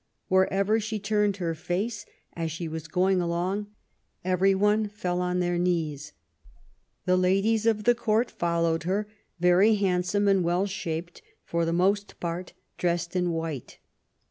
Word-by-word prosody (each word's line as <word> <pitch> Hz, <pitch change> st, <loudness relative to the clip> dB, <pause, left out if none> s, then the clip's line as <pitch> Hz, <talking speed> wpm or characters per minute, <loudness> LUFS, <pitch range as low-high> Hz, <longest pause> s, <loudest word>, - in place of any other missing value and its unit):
Wherever 195 Hz, +3 st, +3 dB
she 215 Hz, 0 st, -3 dB
turned 205 Hz, -1 st, +1 dB
her 170 Hz, -3 st, -1 dB
face, 190 Hz, +7 st, -3 dB, 0.3 s
as 165 Hz, -1 st, -3 dB
she 165 Hz, +2 st, -4 dB
was 160 Hz, 0 st, -6 dB
going 185 Hz, +2 st, +2 dB
along, 180 Hz, +4 st, -1 dB, 0.6 s
every 185 Hz, +1 st, +3 dB
one 210 Hz, +2 st, +2 dB
fell 180 Hz, -4 st, -2 dB
on 180 Hz, 0 st, 0 dB
their 175 Hz, 0 st, 0 dB
knees. 160 Hz, -5 st, -1 dB, 0.9 s
The 185 Hz, -, +3 dB
ladies 195 Hz, +5 st, +2 dB
of 215 Hz, -2 st, +2 dB
the 240 Hz, -, +5 dB
Court 230 Hz, 0 st, 0 dB
followed 170 Hz, -1 st, 0 dB
her, 195 Hz, +5 st, -1 dB, 0.3 s
very 180 Hz, +5 st, +5 dB
handsome 195 Hz, +1 st, +1 dB
and 195 Hz, -2 st, +4 dB
well 175 Hz, +3 st, +1 dB
shaped, 175 Hz, -3 st, -5 dB, 0.2 s
for 170 Hz, 0 st, -1 dB
the 165 Hz, -, 0 dB
most 195 Hz, +4 st, +1 dB
part 175 Hz, +1 st, -4 dB, 0.3 s
dressed 175 Hz, 0 st, -1 dB
in 180 Hz, -1 st, +1 dB
white. 160 Hz, -6 st, -4 dB
180 Hz, 145 wpm, -27 LUFS, 170-205 Hz, 0.9 s, the